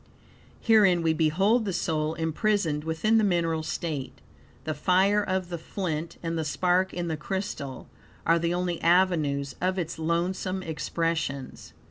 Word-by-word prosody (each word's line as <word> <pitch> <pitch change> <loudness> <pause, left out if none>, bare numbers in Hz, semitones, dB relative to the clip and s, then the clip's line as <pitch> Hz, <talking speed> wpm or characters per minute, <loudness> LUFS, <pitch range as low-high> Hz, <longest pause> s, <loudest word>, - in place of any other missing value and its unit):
Herein 195 -7 +5
we 160 -1 +3
behold 190 +9 +2
the 200 - -2
soul, 155 -1 -1
imprisoned 160 -1 0
within 215 +8 +2
the - - +2
mineral 170 -4 +1
state. 155 -3 -4 0.4
The 155 - -2
fire 190 +7 +3
of 185 -2 -2
the 170 -1 -4
flint, 165 -2 -4
and 165 0 -2
the - - 0
spark 180 +4 +1
in 175 -1 -3
the 160 - -1
crystal, 170 -6 -5 0.4
are 165 +1 +4
the 170 +1 0
only 175 -1 -1
avenues 160 -6 +2
of 185 +1 0
its 165 -2 -3
lonesome 180 +3 -1
expressions. 160 -4 -3
170 Hz, 145 wpm, -27 LUFS, 160-185 Hz, 0.4 s, Herein